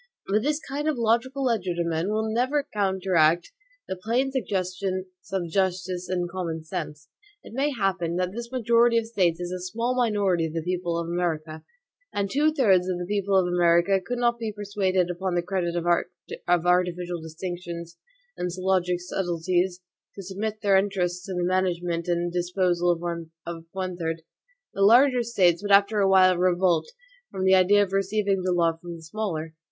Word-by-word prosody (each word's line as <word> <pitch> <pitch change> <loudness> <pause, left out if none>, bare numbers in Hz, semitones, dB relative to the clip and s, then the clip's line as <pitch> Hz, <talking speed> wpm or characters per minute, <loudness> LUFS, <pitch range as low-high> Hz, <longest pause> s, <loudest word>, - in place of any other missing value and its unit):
But 210 +2 +1
this 295 +4 0
kind 285 +2 -3
of 300 - -1
logical 240 +4 +1
legerdemain 175 -7 0
will 220 +1 0
never 260 +6 0
counteract 190 - +2 0.4
the - - -3
plain 235 +8 0
suggestions 190 -5 -2 0.3
of 190 -3 -1
justice 185 0 -1
and 180 -1 -1
common 170 -3 -4
sense. 150 -1 -6 0.4
It - - -12
may 275 +4 +1
happen 190 -8 -1
that 180 0 -1
this 235 +3 -7
majority 235 -1 +3
of 230 - +1
States 185 -7 +1
is 175 0 -4
a 185 - -4
small 230 +7 -2
minority 205 -8 +1
of 155 - -8
the 165 -1 -2
people 175 -1 -2
of 170 0 -3
America;(3) 160 -2 -2 0.5
and 200 -1 0
two 300 +2 +3
thirds 195 - +3
of 180 - -1
the 175 - -4
people 200 -1 0
of 185 - +3
America 175 +2 +3
could 245 +6 -3
not 240 0 +3
long 235 - -24
be 225 -2 -3
persuaded, 195 -3 0
upon 180 +1 -2
the 175 - +1
credit 175 -1 -2
of 170 -1 -2 0.8
artificial 180 -1 +1
distinctions 170 +1 -7 0.4
and 180 - -3
syllogistic 185 -1 0
subtleties, 180 0 -1 0.3
to 195 - -8
submit 210 +3 -4
their 200 -1 +5
interests 180 -2 -1
to 190 - -4
the 180 - -1
management 175 -2 0
and 175 0 -1
disposal 175 -1 +1 0.5
of 165 -1 -7
one 185 -2 -4
third. 165 -1 -3 0.5
The 195 - -4
larger 245 +5 +6
States 190 -7 +2
would 205 0 -3
after 200 +2 +5
a 195 -1 +3
while 185 -1 +5
revolt 180 - +2 0.4
from 185 - -4
the 190 0 +5
idea 195 +2 +5
of 195 -1 -5
receiving 195 0 +1
the 185 0 0
law 170 -2 +2
from 170 +1 -8
the 165 - -12
smaller. 165 -4 -4
185 Hz, 175 wpm, -25 LUFS, 175-205 Hz, 0.8 s, larger